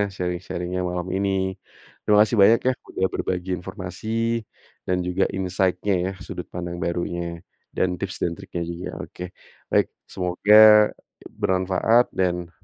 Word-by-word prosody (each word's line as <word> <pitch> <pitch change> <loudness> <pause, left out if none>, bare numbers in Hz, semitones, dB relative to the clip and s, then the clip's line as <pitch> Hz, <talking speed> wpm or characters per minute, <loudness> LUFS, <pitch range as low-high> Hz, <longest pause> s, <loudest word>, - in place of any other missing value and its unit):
sharing-sharing-nya 90 0 -3
malam 90 0 -3
ini. 100 0 0 0.7
Terima 105 - +4
kasih 115 0 -2
banyak 110 +4 +7
ya, 130 - +4 0.2
udah 95 - -1
berbagi 90 0 -2
informasi 95 +2 -8 0.8
dan 90 0 +1
juga 90 +2 +1
insight-nya 95 +1 0
ya, - - -1 0.2
sudut 90 - -7
pandang 85 0 -5
barunya, 85 0 -2 0.5
dan 95 - +2
tips 95 -2 -4
dan 85 - 0
triknya 85 - -6
juga. 85 +2 -6 0.2
Oke, 90 - -10 0.5
baik, - - +3 0.2
semoga 90 +3 +2 0.9
bermanfaat 95 +5 +3
dan 90 -2 0
90 Hz, 130 wpm, -23 LUFS, 90-95 Hz, 0.9 s, banyak